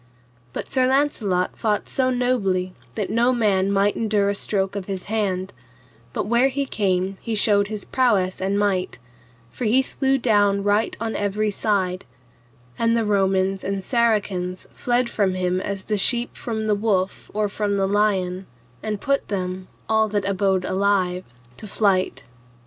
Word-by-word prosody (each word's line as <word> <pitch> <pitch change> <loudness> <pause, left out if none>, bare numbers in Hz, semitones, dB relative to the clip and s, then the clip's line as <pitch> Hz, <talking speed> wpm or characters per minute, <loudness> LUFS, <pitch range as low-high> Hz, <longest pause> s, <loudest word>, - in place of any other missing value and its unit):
But - - -5
Sir 260 -1 +2
Launcelot 240 -10 +1
fought 210 -2 -1
so 260 -1 +1
nobly 205 -8 0 0.2
that 210 -4 -2
no 240 +2 +3
man 200 -5 +2
might 200 +1 +2
endure 210 -3 +1
a - - +1
stroke 195 -1 -1
of 200 -2 -4
his 190 -2 -5
hand, 195 -3 -2 0.6
but - - -2
where 235 +4 +3
he 275 +1 -1
came 190 -4 -1
he 230 - -3
showed 205 -1 +3
his 210 -1 -5
prowess 205 -9 +1
and 195 +1 0
might, 200 -3 0 0.5
for 250 - -5
he 250 +5 +4
slew 270 0 0
down 205 -5 +2
right 205 +2 +1
on 225 0 -3
every 210 +1 0
side; 190 -3 0 0.8
and 230 0 +2
the 225 - +1
Romans 195 -1 +1
and 195 0 -2
Saracens 205 -6 0
fled 245 0 0
from 200 -5 0
him 185 0 0
as 195 -1 -4
the 210 +1 -1
sheep 240 +4 +2
from 220 -2 -4
the 215 - +2
wolf 200 -3 -1
or 210 0 0
from 205 0 -1
the 195 0 +1
lion, 195 -2 0 0.3
and 215 -2 -3
put 275 0 0
them, 185 -2 -3 0.2
all 220 0 +3
that 205 -2 -1
abode 190 -1 +1
alive, 185 -2 +1 0.3
to 215 - -6
flight. 195 -2 +1
205 Hz, 160 wpm, -23 LUFS, 190-225 Hz, 0.8 s, he